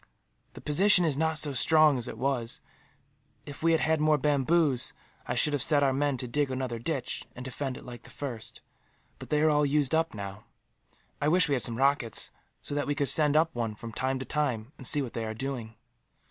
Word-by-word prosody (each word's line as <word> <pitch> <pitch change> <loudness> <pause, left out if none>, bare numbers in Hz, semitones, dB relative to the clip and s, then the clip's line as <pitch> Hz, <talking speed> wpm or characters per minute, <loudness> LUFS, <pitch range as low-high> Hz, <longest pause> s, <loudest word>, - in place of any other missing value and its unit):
"The - - -11
position 180 +4 +4
is 155 -4 +1
not 160 +2 0
so 150 -2 +3
strong 155 0 +4
as 120 - -2
it - - -7
was. 125 -3 -2 0.9
If 145 -2 -8
we 165 +1 +3
had 160 - +2
had 160 -1 +1
more 155 0 +3
bamboos, 145 0 +1 0.3
I - - -2
should 150 - +2
have 145 - 0
set 145 0 +4
our 135 -1 +2
men 140 0 0
to 125 - -3
dig 145 +3 -1
another 130 -3 -3
ditch, 135 +1 -3
and 125 - -8
defend 135 0 -4
it - - -12
like 120 -1 -9
the - - -16
first; 125 -6 -7 0.6
but - - -10
they 150 0 +1
are 155 - +4
all 150 0 +2
used 145 -1 +1
up, 160 -4 0
now. 100 0 -8 0.8
I 145 - +1
wish 175 +2 +3
we 145 - 0
had 130 - 0
some 115 -1 +1
rockets; 135 -4 +1 0.3
so - - -5
that 145 0 -2
we 145 - -1
could 140 -3 0
send 150 +1 +5
up 165 +1 +2
one, 115 -3 -3
from 115 +1 -9
time 130 +2 -1
to 130 - -6
time, 130 -6 -2
and 130 - -7
see 145 -2 +2
what 125 - -7
they 115 - -3
are 110 0 -5
doing." 120 -3 -5
140 Hz, 225 wpm, -28 LUFS, 125-150 Hz, 0.9 s, send